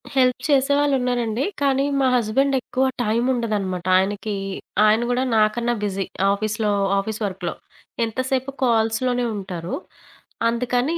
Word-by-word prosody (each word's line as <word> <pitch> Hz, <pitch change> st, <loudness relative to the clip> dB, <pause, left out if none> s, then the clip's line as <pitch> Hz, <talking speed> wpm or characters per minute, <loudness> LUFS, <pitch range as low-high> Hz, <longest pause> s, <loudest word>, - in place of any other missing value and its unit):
Help 255 Hz, -1 st, +3 dB
చేసేవాళ్ళు 280 Hz, +1 st, +3 dB
ఉన్నారండి. 245 Hz, -1 st, -1 dB, 0.2 s
కానీ, 275 Hz, -1 st, +2 dB, 0.2 s
మా 265 Hz, -, +3 dB
హస్బాండెక్కువ 260 Hz, +3 st, +1 dB, 0.2 s
టైముండదనమాట. 215 Hz, -6 st, 0 dB
ఆయనకి 205 Hz, +2 st, -1 dB, 0.5 s
ఆయన 215 Hz, +2 st, +4 dB
కూడా 250 Hz, +1 st, +1 dB
నాకన్నా 235 Hz, +3 st, +2 dB
బిజీ. 195 Hz, -2 st, -1 dB, 0.3 s
ఆఫీస్‌లో 215 Hz, +1 st, -1 dB, 0.3 s
ఆఫీస్ 215 Hz, +2 st, -4 dB
వర్క్‌లో. 185 Hz, -3 st, -3 dB, 0.5 s
ఎంతసేపు 260 Hz, +3 st, -2 dB
కాల్స్‌లోనే 240 Hz, +1 st, +1 dB
ఉంటారు. 180 Hz, -4 st, -5 dB, 0.8 s
అందుకని, 250 Hz, +6 st, 0 dB
235 Hz, 105 wpm, -22 LUFS, 210-260 Hz, 0.8 s, ఆయన